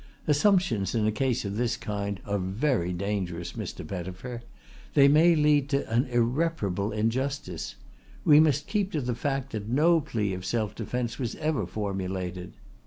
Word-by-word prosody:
Assumptions 150 - +2
in 110 -2 +2
a 110 - +3
case 125 0 0
of 100 +1 -3
this 120 0 0
kind 100 -1 -3
are 100 0 -1
very 95 - 0
dangerous, 90 -2 -3
Mr. - - -6
Pettifer. 95 +6 -6 0.5
They 140 -2 +7
may 160 +4 +6
lead 150 -2 +3
to 140 -1 0
an 120 +3 +3
irreparable 120 - 0
injustice. 115 - -2 0.5
We 150 -1 +8
must 150 -2 +3
keep 205 -2 -1
to 150 - 0
the 125 -1 -1
fact 135 +2 -2
that 105 -1 -5
no 160 +6 +4
plea 105 -7 -2
of 90 0 -5
self 105 +2 -1
defence 120 +2 -3
was 120 -3 -2
ever 150 - -1
formulated. 95 -2 -4
115 Hz, 160 wpm, -27 LUFS, 100-140 Hz, 0.5 s, We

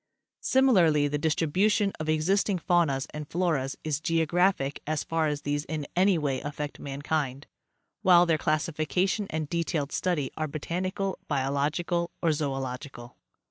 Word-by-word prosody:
Similarly 180 - +4
the 145 +1 -1
distribution 190 +7 +2
of 155 0 -3
existing 185 +5 +2
faunas 165 -6 +1
and 150 -1 -6
floras 160 -7 0
is 150 -3 -1
geographic 165 -2 +1
as 155 -1 -1
far 165 -1 0
as 145 -1 -3
these 145 0 -1
in 155 -2 -4
any 185 0 +4
way 140 -4 -1
affect 145 0 -5
mankind, 140 -1 -3 0.6
while 180 -3 +6
their 165 -2 +2
classification 160 +6 0
and 155 -1 -2
detailed 165 -3 -1
study 160 -8 -1
are 155 0 -2
botanical, 185 +6 -3
biological 150 +5 0
or 170 - +1
zodlogical. 135 -4 -4
155 Hz, 135 wpm, -28 LUFS, 145-175 Hz, 0.6 s, while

